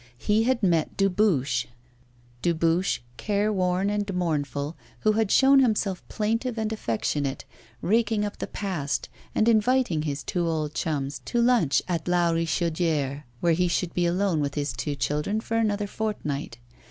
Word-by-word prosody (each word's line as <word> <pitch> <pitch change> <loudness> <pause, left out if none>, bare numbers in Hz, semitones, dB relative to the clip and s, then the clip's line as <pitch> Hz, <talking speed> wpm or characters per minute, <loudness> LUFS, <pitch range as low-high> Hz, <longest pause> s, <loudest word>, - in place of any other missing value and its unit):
He 215 - +2
had 255 -2 +1
met 170 -4 +1
Dubuche 175 - +2 0.7
Dubuche, 170 +1 +1 0.2
careworn 200 -2 +1
and 205 -1 -1
mournful, 150 -3 -1 0.3
who 215 - +4
had 215 -1 +1
shown 270 +4 +6
himself 215 -7 +1
plaintive 230 +3 -1
and 220 0 -1
affectionate, 140 - -2 0.4
raking 220 0 +2
up 205 - -6
the - - -3
past 175 -9 -3 0.3
and 220 - +3
inviting 230 -6 +3
his 145 -2 -3
two 175 -2 -1
old 155 -2 -1
chums 145 -4 -2
to 240 - -1
lunch 235 - +3
at 170 -3 -2
La 175 -1 +3
Richaudière, 160 -3 0 0.2
where 170 -1 +3
he 180 +2 +2
should 175 0 -1
be 175 -1 +1
alone 180 -1 +1
with 145 -1 -2
his 145 -1 -1
two 145 -2 -3
children 150 - -1
for 225 0 -2
another 210 -2 +1
fortnight. 175 - -3
180 Hz, 150 wpm, -26 LUFS, 150-215 Hz, 0.7 s, shown